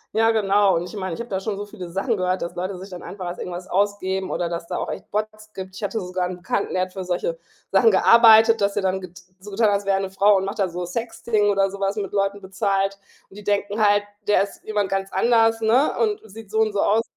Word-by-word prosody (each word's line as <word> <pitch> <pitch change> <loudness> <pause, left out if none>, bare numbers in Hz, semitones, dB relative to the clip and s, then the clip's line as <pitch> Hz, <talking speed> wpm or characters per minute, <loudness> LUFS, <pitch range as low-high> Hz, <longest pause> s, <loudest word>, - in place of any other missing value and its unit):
Ja, 225 +1 +4
genau. 200 -2 +3
Und 170 - 0
ich - - -12
meine, 185 -3 -3
ich 200 - -5
habe 240 - -8
da 190 - -1
schon 205 +1 -3
so 205 +1 -5
viele 185 -3 -9
Sachen 200 +6 -1
gehört, 185 0 -1
dass 170 - -4
Leute 185 +1 -4
sich 190 +2 -10
dann 180 -2 -8
einfach 185 -2 -7
als 175 - -5
irgendwas 180 +1 -6
ausgeben 190 -1 0
oder 170 -1 -2
dass 170 0 -5
da - - -4
auch - - -3
echt - - -8
Bots 215 0 -4
gibt. 190 -1 -7
Ich - - -9
hatte 220 +2 -2
sogar 180 0 -2
'n 180 - -5
Bekannten, 180 +3 -2
der 185 - +1
hat 185 - -6
für 190 -2 -5
solche 185 - -2 0.3
Sachen 455 - +5
gearbeitet, 225 - +7
dass 200 0 +1
der 205 - -1
dann 190 0 0
get 180 -1 -11 0.2
so 205 +2 -11
getan 220 +3 +2
hat, 205 - +3
als 200 0 -3
wäre 195 -1 +2
er - - -2
'ne 195 - -3
Frau 200 +2 +4
und 190 - +1
macht 195 +2 -5
da 195 - +2
so 180 0 -5
Sexting 220 +1 -1
oder 195 -1 +2
so 200 - -8
was 195 +1 0
mit 200 -3 -4
Leuten 200 0 -1
bezahlt. 195 0 -1 0.3
Und 195 - -15
die 210 - -10
denken 205 +1 -1
halt, 205 0 +3 0.2
der 210 - +4
ist 200 - -9
jemand 205 -2 -1
ganz 195 0 -2
anders, 225 +2 +3
ne? 240 +6 +3
Und 425 -2 +1
sieht 215 0 -12
so 220 - 0
und 215 -2 +2
so 200 - +1
aus 220 +2 +3
200 Hz, 275 wpm, -22 LUFS, 190-215 Hz, 0.3 s, gearbeitet